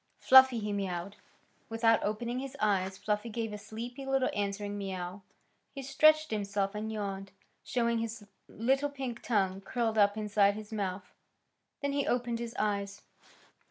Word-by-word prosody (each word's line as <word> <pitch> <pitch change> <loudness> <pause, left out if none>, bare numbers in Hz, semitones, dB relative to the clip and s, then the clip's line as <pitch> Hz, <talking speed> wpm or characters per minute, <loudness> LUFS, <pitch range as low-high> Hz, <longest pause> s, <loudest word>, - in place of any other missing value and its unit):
"Fluffy!" 260 -1 +7
he 210 -2 -2
mewed. 195 0 -3 0.5
Without 225 0 +3
opening 235 +4 -2
his 270 0 -6
eyes 195 -2 +1
Fluffy 210 +3 -1
gave 225 -1 -3
a - - -4
sleepy 240 +6 -7
little 270 -1 +1
answering 205 0 -2
mew. 190 -1 -5 0.5
He 275 - -5
stretched 310 +3 +4
himself 200 -1 -1
and 215 +1 -4
yawned, 195 -2 -4 0.3
showing 235 -2 0
his 225 -1 -5 0.2
little 270 +6 +1
pink 265 -4 -5
tongue 195 -4 0
curled 225 +1 -1
up 205 0 +4
inside 205 -1 +3
his 215 +1 -8
mouth. 190 -3 -4 0.7
Then 280 0 0
he 280 -1 0
opened 240 -1 0
his 235 0 -5
eyes. 200 -1 -2
215 Hz, 150 wpm, -31 LUFS, 200-240 Hz, 0.7 s, Fluffy